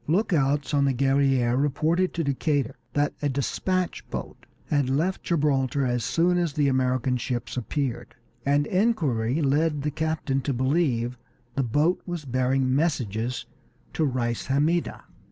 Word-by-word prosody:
Lookouts 150 Hz, -6 st, +1 dB
on 140 Hz, -1 st, +3 dB
the 135 Hz, -2 st, +1 dB
Guerrière 135 Hz, -1 st, +2 dB
reported 160 Hz, +6 st, +1 dB
to 170 Hz, -, 0 dB
Decatur 140 Hz, -2 st, 0 dB, 0.2 s
that 145 Hz, 0 st, +1 dB
a 145 Hz, -, +1 dB
despatch 180 Hz, +7 st, -1 dB
boat -, -, -7 dB, 0.2 s
had 145 Hz, -3 st, +1 dB
left 165 Hz, +8 st, 0 dB
Gibraltar 140 Hz, -4 st, +1 dB
as 120 Hz, -2 st, 0 dB
soon 175 Hz, +1 st, +2 dB
as 170 Hz, -4 st, 0 dB
the 145 Hz, -1 st, +2 dB
American 130 Hz, -1 st, +1 dB
ships 120 Hz, -1 st, -3 dB
appeared, 125 Hz, -1 st, -3 dB, 0.3 s
and 145 Hz, +1 st, +2 dB
inquiry 155 Hz, -, +1 dB
led 145 Hz, +1 st, +1 dB
the 150 Hz, -, -1 dB
captain 155 Hz, -3 st, -1 dB
to 140 Hz, -, -1 dB
believe 125 Hz, -3 st, 0 dB, 0.3 s
the 135 Hz, -, 0 dB
boat 145 Hz, +8 st, +1 dB
was 175 Hz, -4 st, -4 dB
bearing 130 Hz, +1 st, +1 dB
messages 125 Hz, -, -1 dB, 0.5 s
to 160 Hz, -, 0 dB
Reis 120 Hz, -4 st, -1 dB
Hammida. 150 Hz, +6 st, 0 dB
140 Hz, 140 wpm, -26 LUFS, 130-155 Hz, 0.5 s, on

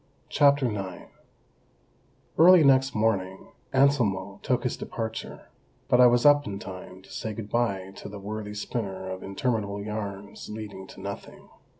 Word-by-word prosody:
CHAPTER 140 Hz, -2 st, +4 dB
IX 95 Hz, -3 st, -6 dB, 1.2 s
Early 175 Hz, 0 st, +8 dB
next 135 Hz, -1 st, +4 dB
morning 95 Hz, -4 st, 0 dB, 0.2 s
Anselmo 115 Hz, -9 st, +2 dB
took -, -, 0 dB
his -, -, -1 dB
departure, 110 Hz, 0 st, -6 dB, 0.4 s
but 125 Hz, -, +5 dB
I 125 Hz, -, +9 dB
was 120 Hz, +1 st, +3 dB
up 145 Hz, -1 st, +6 dB
in 100 Hz, -, -4 dB
time 95 Hz, -1 st, -9 dB
to -, -, -17 dB
say 110 Hz, -, -4 dB
good 105 Hz, -1 st, -7 dB
bye 100 Hz, -6 st, 0 dB
to -, -, -8 dB
the 105 Hz, -, -8 dB
worthy 105 Hz, +1 st, -6 dB
spinner 100 Hz, -3 st, -4 dB
of 95 Hz, -, -6 dB
interminable 100 Hz, 0 st, -2 dB
yarns 100 Hz, -1 st, -6 dB
leading 105 Hz, -3 st, -7 dB
to 95 Hz, -, -12 dB
nothing. 100 Hz, 0 st, -8 dB
105 Hz, 145 wpm, -27 LUFS, 95-120 Hz, 1.2 s, I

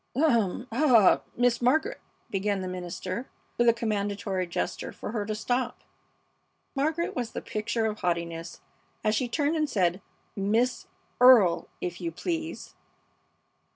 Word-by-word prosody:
"Um! 240 Hz, -, +2 dB
Ah! 235 Hz, -5 st, +5 dB, 0.2 s
Miss 245 Hz, 0 st, +2 dB
Margaret!" 315 Hz, -, +2 dB, 0.3 s
began 200 Hz, 0 st, 0 dB
the 185 Hz, -, -4 dB
minister, 185 Hz, +5 st, -5 dB, 0.3 s
with 240 Hz, 0 st, +6 dB
a -, -, +8 dB
commandatory 205 Hz, -4 st, -2 dB
gesture 170 Hz, -, -3 dB
for -, -, -7 dB
her 210 Hz, -3 st, -2 dB
to 215 Hz, -, -2 dB
stop. 245 Hz, +3 st, -1 dB, 0.9 s
Margaret 315 Hz, +5 st, -1 dB
was 240 Hz, -3 st, -3 dB
the -, -, -3 dB
picture 225 Hz, +1 st, -2 dB
of 215 Hz, -1 st, -2 dB
haughtiness 170 Hz, -1 st, -3 dB, 0.4 s
as 215 Hz, -, +2 dB
she 245 Hz, +3 st, 0 dB
turned 290 Hz, +5 st, 0 dB
and 305 Hz, -2 st, 0 dB
said, 185 Hz, -4 st, +1 dB, 0.3 s
"Miss 220 Hz, +6 st, 0 dB, 0.3 s
Earle, 235 Hz, -9 st, +7 dB
if 175 Hz, 0 st, -4 dB
you 170 Hz, -1 st, -2 dB
please!" 325 Hz, -, -4 dB
220 Hz, 135 wpm, -27 LUFS, 190-250 Hz, 0.9 s, a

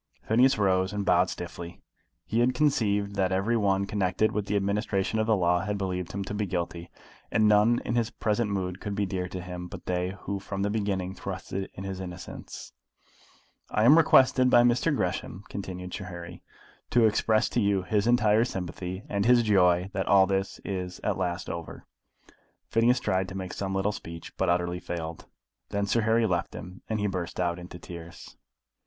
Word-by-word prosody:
Phineas 125 Hz, +4 st, +4 dB
rose, 95 Hz, -2 st, +2 dB
and 100 Hz, -1 st, -2 dB
bowed 90 Hz, 0 st, +4 dB
stiffly. 85 Hz, 0 st, -7 dB, 0.5 s
He 115 Hz, -, 0 dB
had 125 Hz, +1 st, +3 dB
conceived 105 Hz, -8 st, +1 dB
that 95 Hz, -1 st, +1 dB
every 95 Hz, +5 st, +1 dB
one 100 Hz, -3 st, +2 dB
connected 100 Hz, +1 st, +1 dB
with 105 Hz, -1 st, -2 dB
the 105 Hz, -, 0 dB
administration 100 Hz, +1 st, 0 dB
of 110 Hz, -, +1 dB
the 110 Hz, -, +4 dB
law 90 Hz, -2 st, +2 dB
had 100 Hz, +3 st, -2 dB
believed 90 Hz, -2 st, -3 dB
him 100 Hz, 0 st, -3 dB
to 95 Hz, -, -6 dB
be 105 Hz, -1 st, -1 dB
guilty, 85 Hz, -1 st, -3 dB, 0.4 s
and 110 Hz, -, +4 dB
none 105 Hz, +3 st, +5 dB
in -, -, -1 dB
his 115 Hz, -2 st, +1 dB
present 105 Hz, +1 st, -1 dB
mood 95 Hz, -2 st, -3 dB
could 105 Hz, -1 st, -4 dB
be 100 Hz, 0 st, 0 dB
dear 95 Hz, -1 st, -3 dB
to 90 Hz, -, -6 dB
him 90 Hz, 0 st, -6 dB
but -, -, -10 dB
they 90 Hz, +1 st, -1 dB
who 100 Hz, 0 st, -3 dB
from 100 Hz, 0 st, -4 dB
the 100 Hz, -, 0 dB
beginning 100 Hz, -4 st, -1 dB
trusted 95 Hz, 0 st, -5 dB
in 95 Hz, -, -7 dB
his 95 Hz, -1 st, -5 dB
innocence. 90 Hz, -1 st, -8 dB, 1.0 s
"I 105 Hz, -, +1 dB
am 135 Hz, +7 st, +8 dB
requested 130 Hz, -5 st, +5 dB
by 120 Hz, -1 st, +6 dB
Mr. 120 Hz, +6 st, +3 dB
Gresham," 90 Hz, -2 st, -3 dB
continued 90 Hz, -2 st, -6 dB
Sir 100 Hz, -, -5 dB
Harry, 85 Hz, -1 st, -8 dB, 0.5 s
"to 120 Hz, -2 st, +4 dB
express 110 Hz, +1 st, +2 dB
to 120 Hz, -, 0 dB
you 100 Hz, -2 st, +2 dB
his 100 Hz, +3 st, 0 dB
entire 115 Hz, -2 st, +4 dB
sympathy, 95 Hz, -2 st, -5 dB
and 100 Hz, 0 st, -1 dB
his 120 Hz, -1 st, +6 dB
joy 90 Hz, -3 st, +3 dB
that 95 Hz, -1 st, -2 dB
all 95 Hz, 0 st, +6 dB
this 95 Hz, 0 st, -2 dB
is 90 Hz, -2 st, -4 dB
at -, -, 0 dB
last 90 Hz, -1 st, -2 dB
over." 85 Hz, -1 st, -7 dB, 0.9 s
Phineas 120 Hz, +2 st, +4 dB
tried 95 Hz, -4 st, 0 dB
to 95 Hz, -, -6 dB
make 95 Hz, -1 st, -5 dB
some 95 Hz, -1 st, -3 dB
little 95 Hz, +2 st, +1 dB
speech, 85 Hz, -5 st, -9 dB
but 95 Hz, -, 0 dB
utterly 90 Hz, 0 st, 0 dB
failed. 85 Hz, -2 st, -6 dB, 0.4 s
Then 100 Hz, 0 st, -1 dB
Sir 115 Hz, +3 st, +1 dB
Harry 110 Hz, +1 st, +3 dB
left 90 Hz, -5 st, -1 dB
them, 90 Hz, +2 st, -9 dB
and 110 Hz, -1 st, -1 dB
he 105 Hz, -, 0 dB
burst 90 Hz, -3 st, -3 dB
out 85 Hz, -1 st, 0 dB
into 90 Hz, 0 st, -9 dB
tears. 85 Hz, -1 st, -10 dB
95 Hz, 190 wpm, -27 LUFS, 90-105 Hz, 1.0 s, am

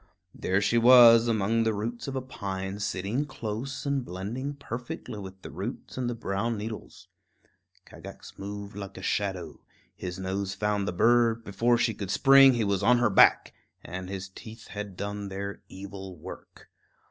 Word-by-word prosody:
There 95 Hz, +2 st, 0 dB
she 115 Hz, +3 st, +3 dB
was, 120 Hz, -1 st, +8 dB
among 115 Hz, 0 st, +1 dB
the 110 Hz, -1 st, +1 dB
roots 115 Hz, +5 st, -4 dB
of 135 Hz, -, -4 dB
a 130 Hz, -, -2 dB
pine, 95 Hz, -5 st, -5 dB
sitting 100 Hz, +6 st, -1 dB
close 120 Hz, +4 st, -5 dB
and 140 Hz, -2 st, 0 dB
blending 120 Hz, +9 st, -5 dB
perfectly 120 Hz, -5 st, -6 dB
with 95 Hz, -1 st, -9 dB
the -, -, -8 dB
roots -, -, -6 dB
and 125 Hz, -2 st, -2 dB
the 120 Hz, -, -3 dB
brown 110 Hz, +1 st, -2 dB
needles. 110 Hz, +1 st, -7 dB, 0.8 s
Kagax -, -, -12 dB
moved 100 Hz, 0 st, -7 dB
like 100 Hz, -1 st, -7 dB
a 95 Hz, -, -8 dB
shadow; 95 Hz, -6 st, -2 dB, 0.3 s
his 90 Hz, -1 st, -6 dB
nose 95 Hz, +1 st, -3 dB
found 105 Hz, -1 st, -1 dB
the -, -, 0 dB
bird; 115 Hz, +4 st, +3 dB
before 115 Hz, +4 st, +2 dB
she 115 Hz, -1 st, +1 dB
could 100 Hz, -2 st, -6 dB
spring 135 Hz, +6 st, +7 dB
he 120 Hz, -2 st, 0 dB
was 100 Hz, -2 st, 0 dB
on 125 Hz, +5 st, +5 dB
her 120 Hz, -3 st, +2 dB
back, 95 Hz, -, +5 dB, 0.3 s
and 90 Hz, +1 st, -6 dB
his 95 Hz, 0 st, -5 dB
teeth 110 Hz, +4 st, -12 dB
had 105 Hz, -3 st, -7 dB
done 100 Hz, 0 st, -4 dB
their 100 Hz, +1 st, -5 dB
evil 95 Hz, -1 st, -9 dB
work. -, -, -12 dB
105 Hz, 170 wpm, -28 LUFS, 95-120 Hz, 0.8 s, was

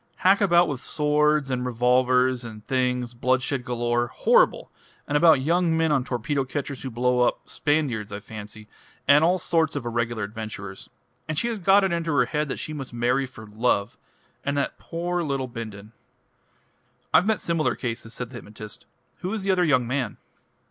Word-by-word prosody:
Hack 195 Hz, +2 st, +6 dB
about 175 Hz, -3 st, +5 dB
with 140 Hz, -4 st, -4 dB
swords 150 Hz, -1 st, +1 dB
and 125 Hz, -1 st, -1 dB
revolvers 125 Hz, +1 st, +2 dB
and 110 Hz, -2 st, -9 dB
things 125 Hz, -2 st, 0 dB
bloodshed 130 Hz, +2 st, 0 dB
galore 120 Hz, -1 st, 0 dB
horrible! -, -, +2 dB, 0.4 s
and 145 Hz, -, -2 dB
about 160 Hz, -3 st, +6 dB
young 165 Hz, +2 st, +2 dB
men 160 Hz, -1 st, +2 dB
on 140 Hz, -4 st, +2 dB
torpedo 135 Hz, +3 st, -1 dB
catchers 140 Hz, +1 st, -5 dB
who 130 Hz, -, -4 dB
blow 125 Hz, +1 st, +1 dB
up 125 Hz, -, +1 dB
Spaniards, 140 Hz, -9 st, -1 dB
I 100 Hz, -, -5 dB
fancy 105 Hz, 0 st, -10 dB, 0.4 s
and 145 Hz, +3 st, +6 dB
all 180 Hz, +3 st, +4 dB
sorts 165 Hz, -3 st, +1 dB
of 140 Hz, -4 st, -3 dB
irregular 120 Hz, -1 st, -1 dB
adventurers. 100 Hz, -2 st, -7 dB, 0.4 s
And 155 Hz, -, -3 dB
she 235 Hz, -, +1 dB
has 225 Hz, -3 st, -3 dB
got 195 Hz, +2 st, +5 dB
it 190 Hz, -, +1 dB
into 165 Hz, -1 st, -1 dB
her 125 Hz, -4 st, +4 dB
head 150 Hz, +4 st, -2 dB
that -, -, -3 dB
she 155 Hz, -, -5 dB
must 135 Hz, -5 st, -7 dB
marry 125 Hz, +3 st, +1 dB
for 110 Hz, -3 st, -12 dB
Love, 105 Hz, -1 st, -1 dB, 0.4 s
and 140 Hz, +1 st, -1 dB
that 140 Hz, -, -2 dB
poor 175 Hz, +1 st, -3 dB
little 135 Hz, -4 st, -2 dB
Bindon 110 Hz, -3 st, -8 dB, 0.6 s
" -, -, -40 dB
"I've 180 Hz, -, +5 dB
met 220 Hz, -1 st, +2 dB
similar 165 Hz, -2 st, 0 dB
cases," 115 Hz, -2 st, -5 dB
said 125 Hz, 0 st, -6 dB
the 125 Hz, -, -7 dB
hypnotist. 105 Hz, -1 st, -9 dB, 0.3 s
"Who 185 Hz, +2 st, -4 dB
is 215 Hz, -3 st, -3 dB
the 195 Hz, -, +2 dB
other 180 Hz, -1 st, +3 dB
young 135 Hz, -7 st, +3 dB
man?" 125 Hz, -3 st, -2 dB
130 Hz, 185 wpm, -25 LUFS, 120-155 Hz, 0.6 s, Hack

